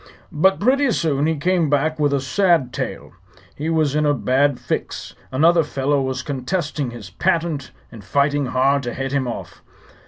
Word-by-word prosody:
"But 190 +6 +3
pretty 270 +5 +3
soon 155 -8 +1
he 160 - +1
came 170 0 +1
back 155 +2 +1
with 145 -1 +2
a 140 - +1
sad 150 -2 +1
tale. - - -5 0.4
He 155 +3 -3
was 155 -4 +1
in 150 0 +1
a 145 -1 +2
bad 135 +1 +1
fix. - - -4 0.2
Another 165 +5 +4
fellow 140 -1 0
was 130 0 -3
contesting 145 0 -2
his 115 -5 -10
patent 160 - -1 0.2
and 110 -4 -11
fighting 140 +5 +1
hard 135 +3 +2
to 120 -2 -5
head 135 0 -3
him 135 -2 0
off. 120 - -7
145 Hz, 175 wpm, -21 LUFS, 130-160 Hz, 0.4 s, Another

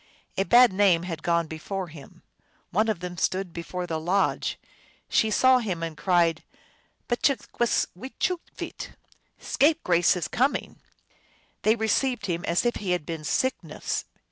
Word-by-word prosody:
A - - +1
bad 240 -2 +6
name 185 -4 +4
had 165 -3 -5
gone 170 0 +1
before 175 +4 -5
him. 150 -3 -14 0.5
One 215 +4 +2
of 195 -6 -1
them 180 -1 -6
stood 185 0 -1
before 180 +1 -5
the 160 -2 -3
lodge. 185 +4 0 0.5
She 220 - +2
saw 255 +4 +5
him, 185 -8 -3
and 165 -1 -4
cried, 170 -1 +2 0.7
"Mcthgwis 240 -2 +1
wechooveet!" 270 - -5 0.4
Scape 310 +3 +2
grace 175 0 +3
is 175 -3 -2
coming! 265 +4 -1 0.4
" - - -36
They 215 +1 +4
received 225 0 0
him 175 -2 -2
as 170 +7 +1
if 240 - +1
he 190 -3 -1
had 175 -4 -2
been 165 -1 -5
Sickness. 260 - -2
185 Hz, 145 wpm, -26 LUFS, 170-230 Hz, 0.7 s, bad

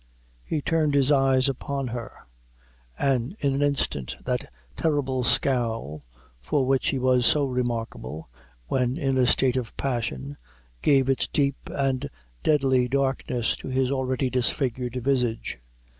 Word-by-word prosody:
He 150 - -2
turned 155 -3 +1
his 140 0 +4
eyes 135 -1 +4
upon 135 0 -3
her; 115 - -7 0.7
and 135 - 0
in 140 -1 +1
an 140 - -1
instant 140 - 0
that - - -2 0.2
terrible 135 -5 0
scowl, 115 - +1 0.4
for 130 - 0
which 135 0 +1
he 135 - 0
was 130 -1 +3
so 140 +4 +4
remarkable, 115 - -3 0.4
when 125 - 0
in 135 -4 0
a 125 - +4
state 130 +1 +2
of 125 -3 -4
passion, 100 - -3 0.4
gave 135 -3 +4
its 135 -1 +1
deep 140 -1 -1
and 135 0 -1 0.3
deadly 135 -4 +3
darkness 130 -3 0
to - - -9
his 130 0 0
already 130 -1 0
disfigured 125 -1 0
visage. 125 - 0
130 Hz, 135 wpm, -25 LUFS, 120-140 Hz, 0.7 s, his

